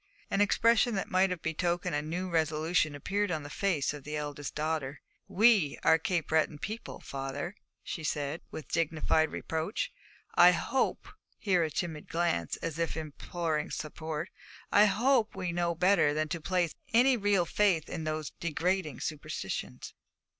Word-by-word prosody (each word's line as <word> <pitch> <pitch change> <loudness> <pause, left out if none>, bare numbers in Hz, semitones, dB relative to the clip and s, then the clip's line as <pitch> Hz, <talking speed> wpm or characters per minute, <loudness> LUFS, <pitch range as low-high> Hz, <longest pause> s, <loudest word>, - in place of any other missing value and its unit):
An 195 - +2
expression 230 +2 +4
that 195 - -3
might 190 +1 +4
have 180 -3 -4
betokened 175 +2 -1
a 145 - +1
new 170 +5 -3
resolution 160 -1 +1
appeared 200 +8 -1
upon 155 -4 -2
the 145 - -8
fine - - -9
face 175 -9 +1
of 145 -2 -9
the 150 +2 -5
eldest 145 -1 -5
daughter. 150 -2 -2 0.3
'We 210 -8 +4
are 160 0 +5
Cape 170 -1 -1
Breton 155 -1 +2
people, 215 +9 -6
father,' 140 +6 -4 0.3
she 160 - -5
said, 145 +1 -2
with 155 - -8
dignified 160 -1 +1
reproach. 165 - -3 0.4
'I - - +8
hope' - - -1 0.3
here 185 -5 +2
a 160 - -1
timid 155 0 -4
glance, 165 - 0
as 165 0 -3
if 165 -1 -1
imploring 155 0 -3
support 155 +1 -5 0.4
'I 205 - +7
hope 225 +3 +2
we 185 -2 -2
know 170 0 0
better 165 -4 +3
than 155 0 0
to 170 +1 -3
place 175 -1 0 0.2
any 250 +3 +5
real 200 -5 +2
faith 180 -3 +2
in 160 - -5
these 155 -1 -3
degrading 170 -2 -1
superstitions.' 145 - -5
165 Hz, 160 wpm, -30 LUFS, 150-185 Hz, 0.4 s, I